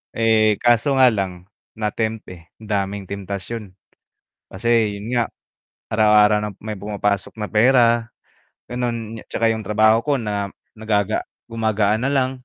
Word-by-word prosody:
eh, 110 -2 +3
kaso 120 +3 +3
nga 130 -2 +6
lang 95 -3 -4 0.3
na-tempt, 110 0 -2
eh. 85 -2 -13
Daming 100 -2 -3
temptasyon, 100 +1 -6 0.8
kasi 115 +1 +1
'yun 115 +4 -4
nga, 120 - +3 0.6
araw-araw 105 -1 +4
na 105 - -2
may 110 0 -5
pumapasok 100 0 -2
na 105 - -3
pera, 120 +1 +3 0.6
ganun, 115 -2 -4
'tsaka 115 0 +1
yung 110 - -5
trabaho 110 +2 +3
ko 145 - -1
na 105 -3 -3 0.2
nagaga 110 -2 0 0.2
gumagaan 110 -1 0
na - - 0
lang, 130 -2 +1
110 Hz, 130 wpm, -21 LUFS, 105-115 Hz, 0.8 s, nga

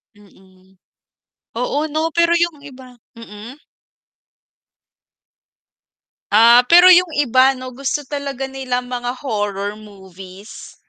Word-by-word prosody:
Mm. 190 -2 -24 0.8
Oo 250 +4 -2
'no, 315 +1 -2
pero 340 0 +2
yung 340 -3 -2
iba 260 -3 -14 0.2
mm? 230 +4 -12 2.7
Ah, 230 +3 +6
pero 355 +2 +7
yung 360 0 +5
iba 265 -1 +2
'no 255 0 -9
gusto 275 +3 -4
talaga 275 -1 -6
nilang 255 -2 -4
mga 245 0 -4
horror 205 -3 -4
movies. 195 0 -14
250 Hz, 100 wpm, -17 LUFS, 205-280 Hz, 2.7 s, pero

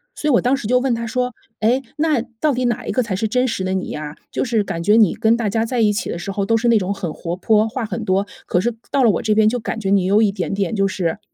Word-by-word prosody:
所 305 - -3
以 - - +4
我 240 - +4
当 255 +3 +2
时 265 - -7
就 250 +2 +3
问 255 -2 0
他 230 0 -4
说： 250 +2 -2 0.3
“诶， 245 +5 +2
那 300 -5 +2 0.2
到 305 - +2
底 250 0 -1
哪 240 -2 -1
一 - - -1
个 255 - +1
才 215 -5 -3
是 220 +4 -1
真 250 +4 +1
实 220 -5 -2
的 185 0 -1
你 190 - -3
呀？ 150 0 -6 0.2
就 - - -1
是 230 -4 +1
感 170 -3 -4
觉 205 +5 +4
你 220 -6 +5
跟 225 +1 +2
大 235 -2 -1
家 220 +2 0
在 245 +1 -2
一 210 -1 +3
起 205 - -3
的 - - -3
时 185 +3 -5
候， 200 0 -2
都 225 +3 +2
是 235 +1 +1
那 230 - +5
种 190 0 -2
很 180 -5 -5
活 170 +2 -4
泼， 215 +3 +2
话 240 +1 -3
很 210 -4 -4
多， 190 +2 +1 0.2
可 180 - +1
是 235 +6 0 0.2
到 275 -2 +2
了 230 - +5
我 175 - -1
这 215 -1 +1
边， 215 0 +4
就 245 +3 +1
感 225 0 -4
觉 195 -3 -2
你 195 -2 +3
有 200 +3 +4
一 205 - +3
点 185 -4 -3
点 195 0 -1
就 195 -2 +2
是” 185 -1 -2
220 Hz, 340 characters per minute, -20 LUFS, 195-240 Hz, 0.3 s, 你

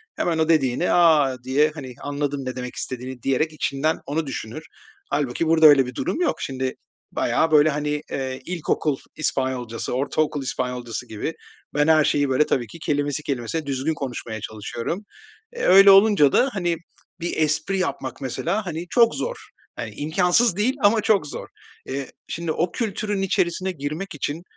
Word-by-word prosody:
hemen 165 -2 0
o 160 0 +1
dediğini, 150 0 +2
a, 155 -6 +5
diye, 145 +4 +2
hani, 130 -5 -7
anladım 145 -1 -3
ne 130 - -4
demek 125 -1 -6
istediğini, 130 0 -6
diyerek 155 +4 +1
içinden 155 +2 0
onu 155 +1 -2
düşünür. 130 +2 -6 0.5
Hâlbuki 145 +2 -1
burada 160 0 +5
öyle 145 -3 +8
bir 125 0 -8
durum 345 - -2
yok. 350 - +2
Şimdi 130 -1 -2 0.4
bayağı, 160 - +1
böyle, 155 0 +6
hani, 150 0 -1
eee, 130 -1 -3
ilkokul 155 -4 -1 0.2
İspanyolcası, 130 -6 -2
ortaokul 145 +1 0
İspanyolcası 125 -2 -4
gibi 110 +9 -4 0.4
ben 150 +1 +2
her 155 -1 +5
şeyi, 145 -1 +1
böyle, 130 +3 +3
tabii 120 -5 0
ki 165 - -12
kelimesi 145 -1 -1
kelimesine 140 +3 -3
düzgün 140 +3 -1
konuşmaya 120 -6 -5
çalışıyorum. 115 - -4 0.6
Eee, 475 - -5
öyle 195 +1 +8
olunca 195 -8 +6
da, 270 - +3
hani, 175 -4 0 0.4
bir 170 -1 -3
espri 155 +5 +1
yapmak 140 -7 -3
mesela, 175 - -2
hani, 170 0 -4
çok 230 +2 +4
zor, - - -3 0.4
hani, - - -5
imkânsız 180 +7 +2
değil 225 +7 +1
ama 215 +2 +5
çok 200 -8 +2
zor. - - -7 0.4
Eee, 135 0 -4 0.2
şimdi 170 -1 -3
o 170 +2 0
kültürün 210 -2 -2
içerisine 185 0 0
girmek 155 +3 -5
için 150 +4 -3
150 Hz, 160 wpm, -23 LUFS, 130-170 Hz, 0.6 s, öyle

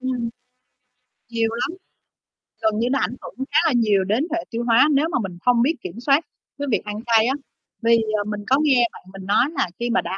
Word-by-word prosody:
Ừm. 250 -2 -2 1.0
Nhiều 230 -1 0
lắm, 335 +10 -3 0.9
gần 220 0 +1
như 240 - +1
nó 275 - +2
ảnh 250 - -1
hưởng 265 +2 -6
khá 300 - +2
là - - +3
nhiều 210 -5 +3
đến 225 - 0
hệ 340 - -1
tiêu 235 0 -3
hóa 235 +4 +5
nếu 290 +3 +3
mà - - +1
mình 185 -3 -6
không 245 -1 +4
biết 300 +7 +2
kiểm 365 - -7
soát 280 +5 +2 0.3
cái 285 - -2
việc - - +1
ăn 210 0 -4
cay 225 -2 +4
á, 265 - +2 0.5
vì, 230 0 +4 0.2
ờ, 205 - -1
mình 205 0 -5
có 265 - +4
nghe 255 -6 +4
bạn - - -13
mình 195 -1 -9
nói 205 +6 +3
là - - +1
khi 240 0 -1
mà 240 - +2
đã 190 - -4
235 Hz, 230 wpm, -22 LUFS, 215-265 Hz, 1.0 s, hóa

